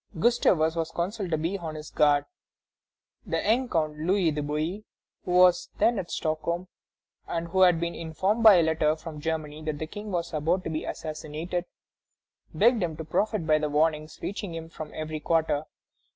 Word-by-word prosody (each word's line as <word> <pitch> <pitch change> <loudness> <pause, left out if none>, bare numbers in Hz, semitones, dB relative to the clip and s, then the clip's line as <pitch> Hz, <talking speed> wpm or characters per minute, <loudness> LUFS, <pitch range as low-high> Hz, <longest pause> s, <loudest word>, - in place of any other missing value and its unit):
Gustavus 170 -7 +3
was 165 -1 -1
counselled 185 +4 -3
to 160 - +1
be 170 +6 -2
on 160 -3 -5
his 155 0 -8
guard. 145 -1 +3 1.0
The - - -2
young 245 +3 +1
Count 155 -2 -1
Louis 175 +1 +2
de 150 0 -2
Bouillé, 155 +8 -2 0.4
who 180 - -3
was 180 +9 +5
then 235 -3 +3
at 175 - -5
Stockholm, 170 +3 -2 0.6
and 170 0 -3
who 190 +2 +1
had 180 -3 +6
been 170 0 -2
informed 185 +7 -1
by 215 -3 +9
a 170 - +5
letter 155 -1 +2
from 155 -1 -9
Germany 155 -1 -3
that 155 -1 -3
the 155 - -3
King 205 +6 -8
was 170 -2 -2
about 165 +5 0
to - - -4
be 155 - -3
assassinated, 160 +3 -4 0.9
begged 225 +7 +3
him 165 -3 -2
to 160 - -6
profit 205 +3 0
by 155 -1 +4
the 150 -1 -1
warnings 155 +1 0
reaching 200 -3 -4
him 165 0 -7
from 155 -2 -8
every 155 0 -4
quarter. 155 -1 +1
165 Hz, 180 wpm, -27 LUFS, 155-185 Hz, 1.0 s, by